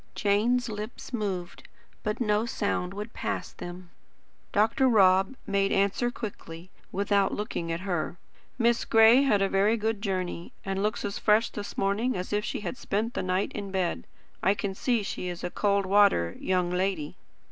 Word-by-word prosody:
Jane's 230 +5 +2
lips 215 +4 -7
moved, 190 -6 -4 0.3
but 210 0 -2
no 215 -1 +1
sound 200 -5 -1
would 210 +3 -6
pass - - -3
them. 175 0 -9 0.6
Dr. 225 +6 +3
Rob 195 0 +4
made 195 0 +1
answer 200 +5 +2
quickly, 185 -7 -8 0.2
without 200 0 +1
looking 205 -5 -3
at 165 +1 -3
her: 175 -3 -2 0.4
"Miss 235 -1 +2
Gray 225 +3 +6
had 210 -8 +3
a - - +3
very 200 +4 +2
good 220 -1 -1
journey, 185 -4 -3
and 195 0 -2
looks 210 +1 -1
as 200 - -3
fresh 215 +2 +3
this 205 -1 -7
morning 205 +4 0
as 180 +3 -4
if 210 0 +1
she 245 - -3
had 245 - -4
spent 220 +4 -2
the - - -2
night 185 +2 0
in 200 -2 -5
bed. 190 -2 -2 0.3
I 195 - +3
can 200 -1 -3
see 235 +2 0
she 185 - -4
is 175 -1 -5
a 180 - -3
cold 200 -1 +1
water 190 - +4
young 180 -1 0
lady." 180 -4 -1
200 Hz, 170 wpm, -28 LUFS, 185-215 Hz, 0.6 s, Gray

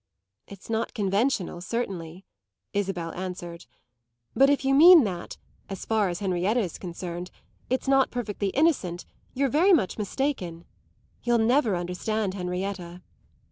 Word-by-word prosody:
"It's 200 -2 -12
not 225 0 -2
conventional, 200 -2 0
certainly," 185 -5 -4 0.5
Isabel 190 -4 -2
answered; 175 -2 -7 0.7
"but 275 +1 +5
if 285 -1 +1
you 270 - +3
mean 330 +2 +9
that 180 -5 -5 0.3
as 195 -2 -6
far 215 -3 +1
as 175 +2 -5
Henrietta 190 +4 +1
is 185 -8 -3
concerned 175 0 -6 0.4
it's 255 +2 -1
not 270 -1 +4
perfectly 215 -4 -3
innocent, 195 - +1 0.3
you're 275 +1 +2
very 330 +9 +4
much 220 - +1
mistaken. 200 - -3 0.6
You'll 240 -1 +2
never 230 -1 +2
understand 185 +4 -2
Henrietta." 180 -1 -5
200 Hz, 130 wpm, -26 LUFS, 180-245 Hz, 0.7 s, mean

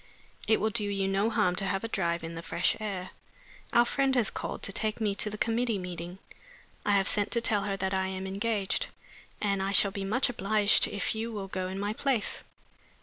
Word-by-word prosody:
It 220 - +4
will 220 +1 +1
do 210 -1 0
you 195 -1 0
no 195 +3 +2
harm 210 -6 +2
to 195 - 0
have 195 +1 -1
a - - -1
drive 170 -6 -1
in 165 +1 -5
the 165 - -6
fresh 170 +1 +1
air. 195 -4 -4 0.6
Our 240 0 +5
friend 270 +1 +1
has 240 -5 +3
called - - -5
to - - 0
take 215 +2 0
me 210 -3 +1
to 205 +1 +1
the 210 - -6
committee 230 0 +1
meeting. 180 -1 -6 0.7
I 205 - +2
have 195 -1 +3
sent 205 -1 +2
to 235 - +3
tell 215 -3 +1
her 195 -1 -1
that 190 0 -1
I 190 0 +1
am 190 0 -4
engaged 200 0 -1 0.5
and 200 -2 0
I 195 +1 0
shall 200 0 +5
be 200 -1 -4
much 220 +7 +2
obliged 210 -2 +3
if 200 - -2
you 225 +1 -3
will 200 -3 -5
go 185 -1 -3
in 190 +1 -5
my 205 +1 -1
place." 255 -2 -1
200 Hz, 220 wpm, -29 LUFS, 190-220 Hz, 0.7 s, Our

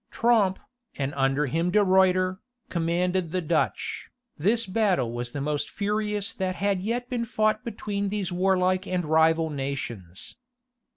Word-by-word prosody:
Tromp, 220 -5 +3 0.4
and 140 0 -2
under 135 +2 +1
him 165 +6 0
De 210 +3 +4
Ruiter, 185 0 +3 0.3
commanded 175 +1 0
the 185 - 0
Dutch. 165 -1 -1 0.3
This 220 +9 +1
battle 185 - +1
was 120 0 -4
the 145 - -4
most 150 +1 -1
furious 210 +1 -2
that 185 -3 -2
had 195 0 0
yet 240 +5 -2
been 245 -2 -2
fought 215 -1 0
between 205 -3 -3
these 200 -3 -2
warlike 185 +1 +1
and 180 -2 -1
rival 160 +1 +3
nations. 125 - -5
185 Hz, 140 wpm, -26 LUFS, 160-205 Hz, 0.4 s, De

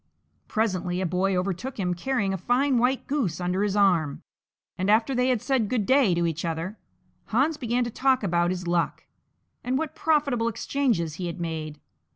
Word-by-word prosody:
Presently 185 -5 -1
a 190 - 0
boy 185 +2 +1
overtook 195 +8 -3
him 180 -2 0
carrying 200 +1 -1
a - - -1
fine 250 +6 +2
white 250 +2 +1
goose 235 - -1
under 180 +2 -1
his 205 -1 0
arm, 175 -8 +2 0.5
and 185 +2 -1
after 225 +5 +3
they 250 0 +2
had 250 -4 +1
said 255 -7 +1
"Good 230 -5 0
day" 260 -8 +4
to 170 0 +1
each 165 -1 -2
other, 170 +5 -3 0.5
Hans 270 +8 +1
began 245 -3 0
to 240 - -4
talk 260 0 +2
about 175 -2 +1
his 180 -1 -3
luck, 170 -1 0 0.6
and 255 +1 0
what 315 0 -3
profitable 285 -7 +1
exchanges 225 - -1
he 175 - -2
had 170 +1 -6
made. 155 -3 -4
205 Hz, 185 wpm, -26 LUFS, 175-255 Hz, 0.6 s, day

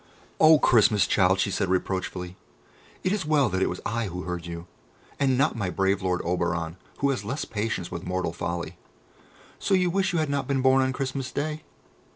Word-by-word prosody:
"O 155 0 +8
Christmas 105 -7 +4
child," 95 -1 +3
she 100 +1 +1
said 95 - -1
reproachfully, 95 -1 -2 0.7
"it 185 - +1
is 210 -1 0
well 150 -5 +2
that 95 0 -1
it - - +2
was 90 - -5
I 115 +1 -1
who 90 0 -5
heard 90 -1 -5
you, 85 0 -6 0.5
and 135 -3 +2
not 140 +4 +2
my 100 -5 -2
brave 95 +2 +1
lord 90 -1 0
Oberon, 85 -1 -1 0.2
who 140 0 +3
has 125 -6 -3
less 130 +8 -3
patience 105 -4 -3
with 85 0 -5
mortal 90 -2 -1
folly. 85 0 -4 0.8
So 195 - +2
you 180 -1 +2
wish 190 +1 +1
you 175 - -1
had 155 -1 +1
not 140 -2 -1
been 135 -2 0
born 130 0 +5
on 130 0 +1
Christmas 130 0 -3
Day? 155 +2 -3
105 Hz, 200 wpm, -26 LUFS, 90-140 Hz, 0.8 s, O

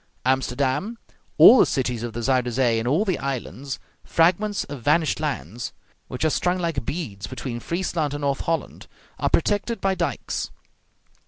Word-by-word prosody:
Amsterdam, 135 - 0 0.4
all 255 - +10
the - - +7
cities 125 -4 -1
of 120 -1 -4
the 120 - -4
Zuyder 125 -1 +2
Zee, 120 -2 +2
and 115 - -3
all 155 - +2
the 190 -4 0
islands, 135 0 -4 0.3
fragments 185 +5 +2
of 140 -3 -8
vanished 155 +5 +2
lands, 120 - -4 0.3
which 125 +5 -3
are 155 - +3
strung 180 +4 +1
like 165 -7 -2
beads 110 - -5
between 125 -2 -5
Friesland 165 -1 -2
and 145 - -5
North 140 -1 0
Holland, 165 -3 -3 0.3
are - - +1
protected 205 +6 +1
by 195 0 +1
dikes. 170 - -2
140 Hz, 160 wpm, -24 LUFS, 125-170 Hz, 0.4 s, all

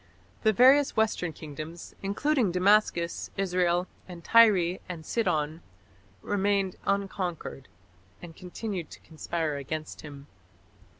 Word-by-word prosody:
The 220 - +4
various 265 +6 +5
western 215 -6 +1
kingdoms, 155 +2 -9
including 220 +3 +1
Damascus, 180 -2 +2
Israel, 180 -2 +1 0.2
and 175 -2 -10
Tyre 195 -6 +5
and 165 -3 -7
Sidon, 160 -7 -1 0.6
remained 200 -2 0
unconquered, 190 -8 -3 0.5
and 170 -2 -11
continued 180 -1 -6
to - - -12
conspire 160 -1 -3
against 155 +3 -6
him. 145 -2 -10
180 Hz, 105 wpm, -28 LUFS, 165-200 Hz, 0.6 s, various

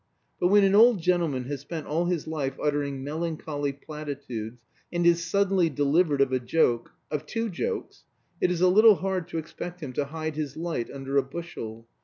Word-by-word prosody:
But 175 - +3
when 205 +2 +5
an 195 0 +4
old 225 0 +7
gentleman 165 -7 +1
has 140 +1 -5
spent 155 +2 -6
all 165 +4 0
his 175 -4 -1
life 140 -4 -3
uttering 145 -2 -1
melancholy 150 -1 -3
platitudes, 140 -6 -7 0.3
and 175 0 0
is 170 0 +4
suddenly 190 0 +2
delivered 145 +1 +2
of 135 -1 +2
a 130 - +2
joke 120 -2 +1 0.2
of 150 0 -3
two 225 +4 -2
jokes 455 - -4 0.4
it - - +3
is 180 -1 -1
a 185 - +6
little 215 +3 +7
hard 190 -2 -2
to 165 - -5
expect 175 +2 -6
him 145 -6 -6
to 145 - 0
hide 155 +1 -5
his 150 -3 -3
light 165 -8 -3
under 135 0 -3
a - - +6
bushel. 125 -7 -7
155 Hz, 190 wpm, -27 LUFS, 140-175 Hz, 0.4 s, old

